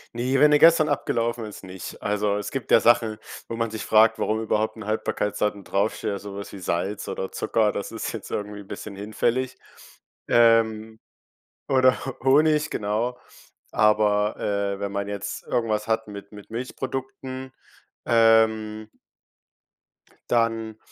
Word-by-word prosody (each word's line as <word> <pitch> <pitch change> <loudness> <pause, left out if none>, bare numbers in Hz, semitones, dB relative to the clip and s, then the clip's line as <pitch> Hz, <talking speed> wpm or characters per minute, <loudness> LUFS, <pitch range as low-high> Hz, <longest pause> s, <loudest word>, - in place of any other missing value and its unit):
Ne, 130 +3 0
wenn 150 - +7
der 150 0 +5
gestern 165 -2 +6
abgelaufen 120 -4 -1
ist, 105 -2 -10
nicht. 95 0 -9
Also, 105 0 0
es 105 - -4
gibt 135 -4 -5
ja - - +8
Sachen, 115 -2 +3 0.3
wo 115 - -5
man 115 -1 -1
sich 110 -2 -6
fragt, 110 +1 +5
warum 110 +1 -1
überhaupt 110 0 0
'n 110 -3 -9
Haltbarkeitsdatum 105 -1 -1
draufsteht, 100 0 -1
sowas 100 0 -8
wie 100 - -9
Salz 95 +3 -2
oder 95 - -4
Zucker, 110 -2 +1
das 100 - -5
ist - - -4
jetzt - - -8
irgendwie 105 0 -4
bisschen 100 +1 -8
hinfällig, 115 +5 -1 0.7
ähm, 110 -1 +3 0.7
oder 130 -1 +3
Ho 130 - -5
Honig, 150 +2 +4
genau. 115 +4 -2 0.5
Aber, 105 0 +3
äh, 100 -1 -1
wenn 100 0 -3
man 100 0 -3
jetzt 100 -1 -5
irgendwas 110 -2 -1
hat 110 0 0
mit 100 -1 -9
mit 105 -1 -13
Milchprodukten, 130 +2 -5 0.5
ähm 110 -2 +3 1.4
dann, 115 -2 0
110 Hz, 140 wpm, -24 LUFS, 105-120 Hz, 1.4 s, ja